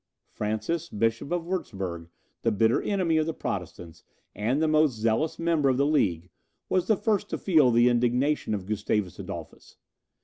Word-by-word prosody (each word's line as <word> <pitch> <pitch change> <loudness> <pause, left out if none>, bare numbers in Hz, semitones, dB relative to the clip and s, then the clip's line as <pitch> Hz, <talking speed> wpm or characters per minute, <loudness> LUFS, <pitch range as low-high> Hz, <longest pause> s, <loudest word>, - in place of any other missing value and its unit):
Francis, 110 +11 -2
Bishop 115 +6 -1
of 175 -1 0
Wurtzburg, 95 - -4 0.3
the 115 - +1
bitter 110 +2 +2
enemy 180 -6 +1
of 155 0 +1
the 165 - -3
Protestants, 90 -3 -6 0.3
and 120 +7 0
the 160 - +2
most 155 -4 +3
zealous 115 +8 0
member 165 -4 +1
of 130 - +1
the 140 - +3
League, 95 - 0 0.4
was 185 -1 +1
the 215 - +3
first 205 -1 0
to - - -2
feel 155 -9 +4
the 120 0 +4
indignation 125 +1 +1
of 95 -3 -6
Gustavus 105 -2 -2
Adolphus. - - -9
125 Hz, 165 wpm, -27 LUFS, 105-160 Hz, 0.4 s, feel